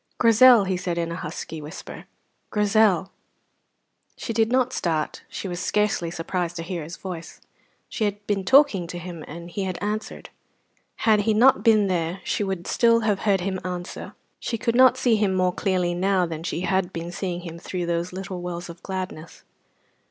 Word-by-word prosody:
"Grizel," 230 0 +7
he 190 -1 -1
said 180 -1 -3
in 170 0 -1
a - - -3
husky 160 0 -6
whisper, 150 +4 -9 0.4
"Grizel!" 210 -3 +2 1.1
She 230 - -4
did 225 0 +2
not 255 0 +2
start; 160 -3 -1
she - - -5
was 175 -1 -4
scarcely 210 -5 0
surprised 175 +1 -3
to 165 - -4
hear 170 -1 -4
his 165 +3 -8
voice: 180 -3 -8 0.5
she 220 - -2
had 205 0 -3
been 200 -2 -1
talking 200 - +4
to 175 - -6
him, 175 -2 -7
and 170 +2 -9
he 200 - -3
had 185 -2 -3
answered. 215 +1 -4 0.7
Had 215 -2 +5
he 215 +1 +1
not 250 +4 +5
been 215 -3 +5
there 175 -1 -1
she - - -1
would 190 -3 -3
still 230 -1 +3
have 210 -3 +1
heard 195 -2 +3
him 190 0 -2
answer. 180 -1 -6 0.2
She 230 - -3
could 230 +1 0
not 255 +1 +6
see 245 -4 +3
him 200 -3 +1
more 185 -1 +2
clearly 180 -3 0
now 185 +1 +2
than 160 -2 -5
she 170 0 -3
had 190 -1 0
been 170 0 -5
seeing 175 -1 -4
him 170 -1 -8
through 180 0 -4
those 170 +1 -1
little 185 -1 -6
wells 175 0 -5
of 170 0 -10
gladness. 185 -4 -6
185 Hz, 185 wpm, -24 LUFS, 175-210 Hz, 1.1 s, Grizel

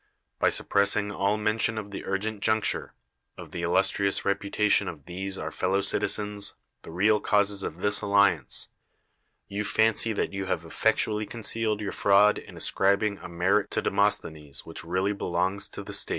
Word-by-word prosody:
By - - +4
suppressing 100 +1 +2
all 100 +1 0
mention 110 +1 0
of 105 -1 -6
the 100 - -6
urgent 100 +2 -2
juncture, 110 0 0 0.4
of - - -10
the 85 - -5
illustrious 95 +3 +2
reputation 100 +1 +1
of 75 -4 -8
these 95 +2 -5
our 80 0 -5
fellow 95 +2 0
citizens, 105 +1 -1 0.3
the - - -12
real 105 +6 +2
causes 100 -1 +1
of 85 -1 -6
this 100 0 +1
alliance, 100 -9 +2 0.8
you 100 +1 -3
fancy 110 +2 +2
that 100 - -2
you 95 0 -3
have 85 -3 -2
effectually 105 +4 +1
con 120 -2 -8
cealed 110 -1 0
your 100 - -3
fraud 100 +1 +4
in - - -13
ascribing 100 +1 +1
a - - -9
merit 95 +4 +1
to - - -1
De - - 0
mosthenes 75 -3 -1
which - - -7
really 95 +4 0
belongs 95 +1 -1
to - - -8
the - - -9
state. - - 0
100 Hz, 170 wpm, -27 LUFS, 95-105 Hz, 0.8 s, By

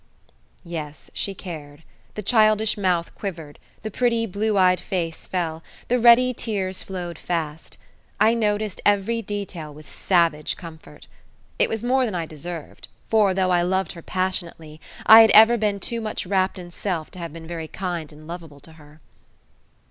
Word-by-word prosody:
Yes 155 -3 -7
she 195 - -2
cared. 155 -5 -9 0.3
The 210 - -5
childish 215 0 +3
mouth 180 -4 0
quivered, 165 -7 -7 0.2
the 215 - -4
pretty 230 +1 +1
blue 210 +1 -1
eyed 180 -1 +4
face 170 -4 -4
fell, 165 -3 -2 0.3
the 250 +1 +2
ready 245 +2 +6
tears 195 -5 -3
flowed 175 -3 -6
fast. 160 -3 -4 0.4
I 225 - +5
noticed 210 -3 -1
every 205 +3 +2
detail 195 -7 -6
with 150 +1 -14
savage 165 -5 +1
comfort. 165 -2 -12 0.5
It - - +3
was 225 0 -3
more 255 +1 +2
than 215 -6 -3
I 170 -2 -2
deserved, 160 +1 -8 0.2
for, 210 -4 +3
though 185 -1 +1
I 175 -1 +3
loved 190 +2 0
her 170 - -10
passionately, 170 -4 -4 0.2
I 225 +1 +11
had 225 - +6
ever 225 +2 +8
been 210 -3 0
too 235 +3 -3
much 215 -2 -3
wrapped 190 0 0
in 175 -1 -9
self 175 -4 -4
to 185 - -11
have 170 -2 -6
been 165 +1 -10
very 165 -1 -6
kind 175 -4 -4
and 155 +1 -14
lovable 165 -3 -9
to 160 - -13
her. 150 0 -18
185 Hz, 165 wpm, -23 LUFS, 165-210 Hz, 0.5 s, I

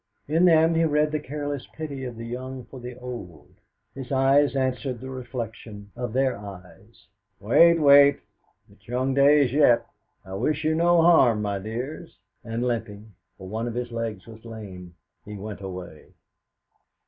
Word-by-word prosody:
In 165 +4 +3
them 165 -1 +5
he 165 0 +2
read 150 -1 +2
the 155 - -1
careless 145 -1 -5
pity 140 -4 -5
of 125 -2 -6
the 115 - -7
young 130 +1 -6
for 130 +2 -11
the 125 0 -8
old. 120 -10 -9 0.4
His 135 -1 -8
eyes 135 +2 +3
answered 130 -1 -2
the 130 +2 -8
reflection 115 -5 -7
of 120 -1 -4
their 130 +1 +1
eyes, 100 +2 -13 0.3
'Wait, 170 +11 +5
wait! 140 -2 +7 0.5
It 100 0 -22
is - - -28
young 130 +3 -1
days 140 -1 +4
yet! 140 -5 +4 0.4
I 95 - -9
wish 150 +10 -1
you 155 +1 +2
no 170 +1 +4
harm, 125 -11 +5
my 100 -1 -2
dears!' 120 - -6 0.3
and 115 +1 -3
limping 110 -3 -4 0.2
for 95 - -10
one 110 +4 -3
of 120 - -5
his 120 0 -4
legs 115 -5 -4
was 110 -1 -13
lame 95 -6 -10 0.3
he 105 - -9
went 100 0 -8
away. 90 -5 -8
125 Hz, 165 wpm, -25 LUFS, 110-140 Hz, 0.5 s, wait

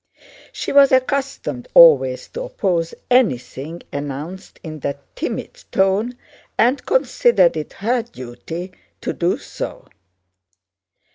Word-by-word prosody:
She - - -4
was 280 -1 +6
accustomed 260 - 0
always 135 -6 +6
to 480 - -6
oppose 180 - -1 0.2
anything 165 - 0
announced 145 +6 -6
in 155 -2 -7
that 140 0 -3 0.2
timid - - -5
tone 200 +6 +1 0.4
and 250 +5 +3
considered 480 - +3
it 155 -1 -5
her 235 +4 0
duty 170 - -8 0.3
to - - -2
do - - 0
so. - - -7
185 Hz, 110 wpm, -20 LUFS, -, 0.4 s, was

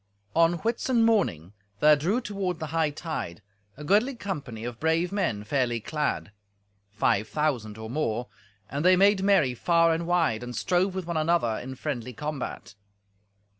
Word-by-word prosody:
On 165 +1 +5
Whitsun 230 +4 +1
morning 100 - +1 0.3
there 150 +4 +7
drew 185 - 0
toward 195 -5 -3
the 155 -1 -5
hightide 155 - -2 0.4
a 150 - -8
goodly 215 - +2
company 140 - -5
of 120 -1 -6
brave 160 +3 +1
men, 175 - -1
fairly 120 0 0
clad: 150 -3 -2 0.6
five 105 0 +1
thousand 120 -9 -1
or 110 0 -7
more, 120 -2 -2 0.4
and 140 +3 -3
they 185 +1 +6
made 200 +1 +4
merry 190 -10 +3
far 165 +5 +3
and 165 +1 -3
wide, 165 -11 +1
and 125 0 -6
strove 185 +1 +1
with 190 -2 -3
one 170 -1 -2
another 155 -8 +1
in 130 +1 -7
friendly 125 -4 -4
combat. 150 +2 -5
155 Hz, 155 wpm, -27 LUFS, 120-180 Hz, 0.6 s, there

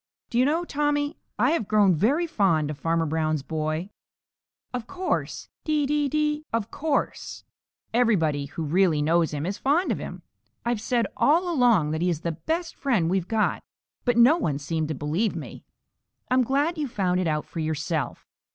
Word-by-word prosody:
"Do 235 - +1
you 255 - +5
know, 325 +5 +1
Tommy, 290 0 0 0.2
I've 250 0 +2
grown 205 -3 +4
very 260 - +2
fond 170 - +1
of 145 - -8
Farmer 165 +1 +1
Brown's 155 -2 -1
boy." 155 +5 -3 0.8
"Of 245 -2 -4
course. 370 0 -3 0.2
Dee, 305 -2 +1
dee, 290 0 +1
dee, 300 +1 0
of 230 -1 -2
course. 295 -1 -2 0.5
Everybody 165 -12 +2
who 160 - -5
really 160 -1 +2
knows 165 +1 +3
him 150 0 -3
is 195 +3 -3
fond 310 +7 +2
of - - -1
him. - - -7 0.4
I've 235 -3 0
said 235 0 +1
all 335 +5 +3
along 235 - +3
that 160 +1 -2
he 180 - +2
is 165 -3 -2
the 170 - -1
best 325 - -3
friend 210 - +1
we've 185 -2 0
got, 220 -2 0 0.4
but 245 -2 +1
no 250 +8 +7
one 150 - -1
seemed 155 +2 -2
to 155 - -3
believe 160 - -1
me. - - -8 0.7
I'm 255 0 +5
glad 290 +7 0
you've 290 -3 -2
found 185 -5 0
it 185 - 0
out 150 -1 -1
for 170 - -7
yourself. 155 -1 -2
205 Hz, 180 wpm, -25 LUFS, -, 0.8 s, no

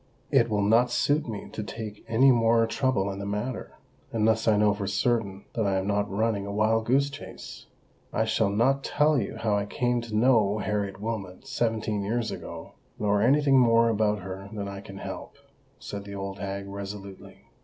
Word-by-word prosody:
"It - - +4
will 105 -2 +1
not 115 +4 +4
suit 145 +4 +1
me 105 -3 -6
to - - -4
take 105 0 -7
any 130 +4 +5
more 115 -1 +4
trouble 115 -4 0
in 95 - -6
the 100 - -4
matter, 105 +5 -4 0.4
unless 110 0 +1
I 110 -2 +5
know 105 0 +4
for 100 -1 -4
certain 100 -3 0
that 110 -4 0
I 95 -1 +1
am 95 - -1
not 105 0 0
running 100 0 0
a - - -4
wild 110 +2 +1
goose 140 +3 +3
chase." - - -10 0.4
"I 110 - +1
shall 110 -1 +1
not 130 +7 +2
tell 150 -1 +2
you - - -3
how 110 -2 0
I 100 0 -1
came 120 +2 0
to 115 -2 -6
know 110 -3 +4
Harriet 100 -2 -2
Wilmot 105 -1 -5
seventeen 110 -5 -1
years 115 +3 -1
ago, - - -8 0.3
nor 105 -1 +1
any 140 +6 +4
thing 135 -2 +5
more 115 -1 +5
about 105 -2 +1
her 95 +1 -7
than 100 -2 -4
I 100 0 -6
can 95 -1 -10
help," - - -7 0.4
said 100 -1 -7
the 100 0 -7
old 100 0 -5
hag 100 0 -4
resolutely. 100 -1 -8
105 Hz, 195 wpm, -27 LUFS, 100-115 Hz, 0.4 s, any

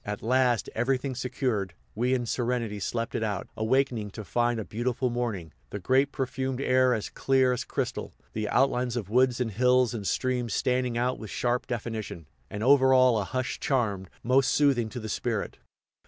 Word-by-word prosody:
At 105 0 -5
last, 125 0 +2
everything 130 +1 0
secured, 120 -7 -2 0.2
we 125 +4 +1
in 120 -1 -2
serenity 120 -3 -1
slept 115 +5 -3
it - - -1
out, 105 -3 -2
awakening 115 -1 0
to 110 - -6
find 120 +5 0
a 110 - -4
beautiful 125 +3 -1
morning, 110 - -3 0.2
the - - -5
grape 130 +8 +2
perfumed 130 0 -3
air 130 -2 +3
as 110 - -4
clear 130 -1 +2
as 125 - -2
crystal, - - -3 0.2
the 105 -1 -2
outlines 125 -2 +1
of 105 -4 -5
woods 125 +1 +3
and 120 -3 -1
hills 125 +2 +3
and 105 -4 -4
streams 125 -4 -1
standing 125 -1 0
out 125 +2 0
with 110 - -8
sharp 125 +3 -1
definition, 110 -7 -5 0.2
and 105 +1 -5
over 130 0 +5
all 130 -3 +5
a - - 0
hushed 130 +4 -3
charm 105 -8 0 0.2
most 130 +2 +3
soothing 135 -6 +2
to 115 - -6
the 110 - -6
spirit. 110 -1 -3
120 Hz, 180 wpm, -27 LUFS, 110-130 Hz, 0.2 s, over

